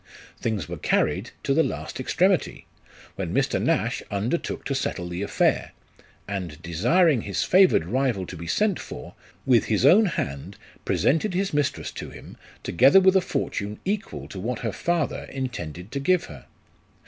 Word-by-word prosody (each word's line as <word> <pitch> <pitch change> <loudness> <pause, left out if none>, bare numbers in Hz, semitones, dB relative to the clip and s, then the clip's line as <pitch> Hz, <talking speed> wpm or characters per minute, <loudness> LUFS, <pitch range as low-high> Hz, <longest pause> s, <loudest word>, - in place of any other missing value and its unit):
Things 105 -9 -2
were - - -6
carried - - +1
to 135 - +1
the 160 - +4
last - - -4
extremity, - - +1 0.5
when - - -3
Mr. - - +1
Nash - - 0
undertook 110 +11 -2
to 140 - -1
settle 95 -9 -2
the 90 +1 -5
affair; 100 - +1 0.5
and 90 -7 -5
desiring 120 - +3
his 100 - -2
favoured 185 - +5
rival 120 -2 0
to - - -8
be 85 +2 -8
sent 205 - +1
for, 60 - -9 0.3
with 125 -3 +4
his 110 +3 +1
own 200 +9 +7
hand 70 - -4 0.3
presented 175 +6 +1
his 195 -1 -1
mistress 145 -1 -1
to - - -7
him, - - -12 0.3
together 135 - +6
with 190 0 +4
a 190 - +5
fortune 105 - -3
equal 205 +2 -3
to 95 - -7
what 115 +5 -3
her 115 -3 -2
father 170 -4 -1
intended 95 - -6
to 140 - -2
give 180 +6 +2
her. 70 -4 -11
125 Hz, 160 wpm, -25 LUFS, -, 0.5 s, own